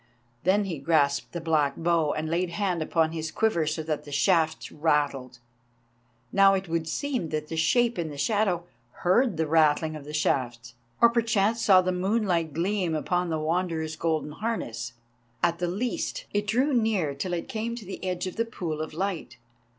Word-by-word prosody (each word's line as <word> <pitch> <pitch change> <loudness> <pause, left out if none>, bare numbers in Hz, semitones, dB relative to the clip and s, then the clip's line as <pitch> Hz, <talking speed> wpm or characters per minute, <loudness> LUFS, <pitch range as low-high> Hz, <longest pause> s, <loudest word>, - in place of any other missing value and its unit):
Then 200 +3 +4
he 175 -7 -4
grasped 140 -1 +1
the 170 - -4
black 155 -4 +1
bow 165 -3 +2
and 155 +1 -3
laid 170 +2 0
hand 180 -2 -1
upon 160 0 +1
his 160 -1 -4
quiver 170 -5 +1
so 155 +1 -2
that 155 -1 -2
the 145 - -11
shafts 160 +2 +1
rattled. 145 -5 0 0.9
Now 195 0 +6
it 190 -1 -3
would 165 -1 -1
seem 260 - -2
that 155 0 -3
the 165 - -4
shape 235 +7 +2
in 165 -2 -2
the 145 - -8
shadow 185 +1 +1 0.4
heard 195 +2 +3
the 160 - +1
rattling 155 0 +3
of 150 - -8
the 150 - -7
shafts, 125 -5 -1 0.3
or 235 - +8
perchance 225 -1 +1
saw 190 -4 +6
the 185 - 0
moonlight 180 -3 0
gleam 175 +1 0
upon 175 +3 0
the 160 - 0
Wanderer's 160 0 -1
golden 160 -2 -1
harness—at 120 - -4
the 175 - 0
least, 215 +8 -3
it 205 0 0
drew 255 +7 +2
near 215 - +1
till 175 +6 -4
it 170 - -3
came 230 +1 -3
to 230 -3 -9
the 190 - -7
edge 180 -1 -2
of 185 - -6
the 230 - +1
pool 165 -9 -4
of 155 0 -6
light. 170 -9 -3
170 Hz, 180 wpm, -27 LUFS, 155-195 Hz, 0.9 s, or